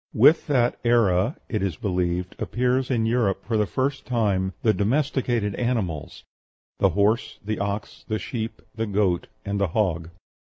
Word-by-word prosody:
With 145 +9 +6
that 125 -5 +2
era, 115 - +3
it 110 - -2
is 95 -5 -1
believed, 90 -1 -1
appears 125 +1 0
in 115 -4 +1
Europe 110 -5 +1
for 115 - -1
the 105 -1 +2
first 135 +4 -1
time 100 -6 +1
the 110 - +4
domesticated 120 -2 0
animals 100 - -2 0.6
the - - +5
horse, 105 +4 +1
the 110 +1 -2
ox, 100 +1 -4
the 110 - 0
sheep, 115 0 -5
the 115 0 -2
goat, 100 -4 +1 0.2
and 100 0 -1
the 100 - +3
hog. 85 -4 0
110 Hz, 155 wpm, -24 LUFS, 95-120 Hz, 0.6 s, With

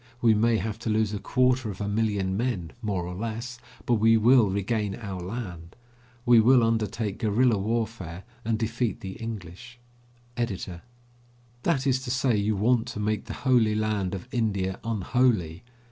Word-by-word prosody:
We 115 -2 +5
may 115 +2 +3
have 110 0 -3
to 115 - -4
lose 110 -1 +1
a 105 - -2
quarter 130 0 +1
of 95 - -7
a 100 - -2
million 100 -3 0
men, 100 -7 -2
more 100 -6 -2
or 90 - -5
less, 115 +4 -5 0.3
but 120 -2 +2
we 115 +1 +6
will 115 -1 +5
regain 100 +1 -1
our 100 -5 -6
land. 90 -4 -6 0.5
We 120 -1 +7
will 120 +2 +6
undertake 110 -2 -1
guerilla 115 0 +2
warfare, 110 -5 -3 0.2
and 110 0 0
defeat 115 +1 -2
the 95 - -5
English. 115 +1 -8 0.6
EDITOR: 95 -7 -3 0.8
That 140 -4 +1
is 130 -1 +2
to - - -5
say, 125 -1 +2
you 105 +1 +1
want 115 +4 +2
to 115 -3 -6
make 105 0 -1
the 110 - -6
holy 120 -5 +4
land 105 -3 -1
of 95 - -8
India 100 -6 -1
unholy. 110 -6 0
110 Hz, 165 wpm, -26 LUFS, 100-120 Hz, 0.8 s, We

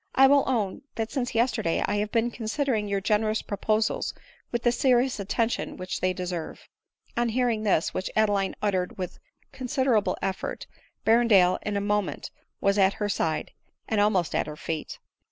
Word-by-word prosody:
I 270 - +7
will 280 +1 +5
own, 215 -7 -1
that 225 0 -3
since 250 -3 -2
yesterday 225 -8 +1
I 205 - -1
have 210 0 -1
been 235 0 +1
considering 230 -1 -1
your 200 -1 -1
generous 215 +2 +1
proposals 215 +2 0 0.4
with 240 -1 -2
the 240 - +4
serious 250 -1 +2
attention 225 +4 -1
which 185 0 -4
they 185 - +2
deserve." 180 -3 -5 0.5
On 240 0 +1
hearing 235 -2 +1
this, 195 -6 +1
which 185 - -2
Adeline 205 -3 +2
uttered 185 -3 0
with 185 -2 -5 0.3
consider 260 -1 0
able 210 -1 +1
effort, 190 -1 -3 0.4
Berrendale 220 -6 +5
in 210 -1 -2
a - - 0
moment 205 -1 -1 0.3
was 200 +1 +2
at 195 0 +5
her 210 -1 -2
side, 160 -5 -1 0.4
and 220 -2 +1
almost 195 -5 +2
at - - 0
her 150 0 -7
feet. 160 0 -4
210 Hz, 170 wpm, -26 LUFS, 195-235 Hz, 0.5 s, I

